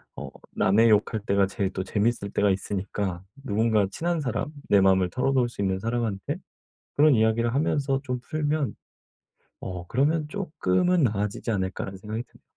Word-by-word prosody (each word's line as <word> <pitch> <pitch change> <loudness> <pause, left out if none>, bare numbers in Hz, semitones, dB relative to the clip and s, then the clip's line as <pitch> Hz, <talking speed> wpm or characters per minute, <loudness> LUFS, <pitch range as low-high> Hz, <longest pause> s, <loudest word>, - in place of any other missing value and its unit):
어 - - -7 0.3
남의 110 +4 +4
욕할 110 +1 +2
때가 100 0 +3
제일 95 0 -2
또 95 - -2
재밌을 105 +1 -1
때가 105 - +2
있으니까 95 -1 -3 0.2
누군가 110 -3 +2
친한 170 - -1
사람, 125 +1 -2 0.2
내 100 - +5
마음을 95 -1 +4
털어놓을 130 -1 +1
수 115 - -7
있는 95 -1 0
사람한테 115 -2 -2 0.6
그런 150 0 +6
이야기를 115 +1 +2
하면서 140 -1 +1
좀 125 -3 -3
풀면 150 -2 -1 0.9
어 90 -2 -6
'그러면 150 - +1
쪼끔은 175 - +1
나아지지 105 0 -1
않을까?'라는 95 -1 -3
생각이 110 +4 -5
듭니다. - - -24
110 Hz, 360 characters per minute, -26 LUFS, 100-135 Hz, 0.9 s, 그런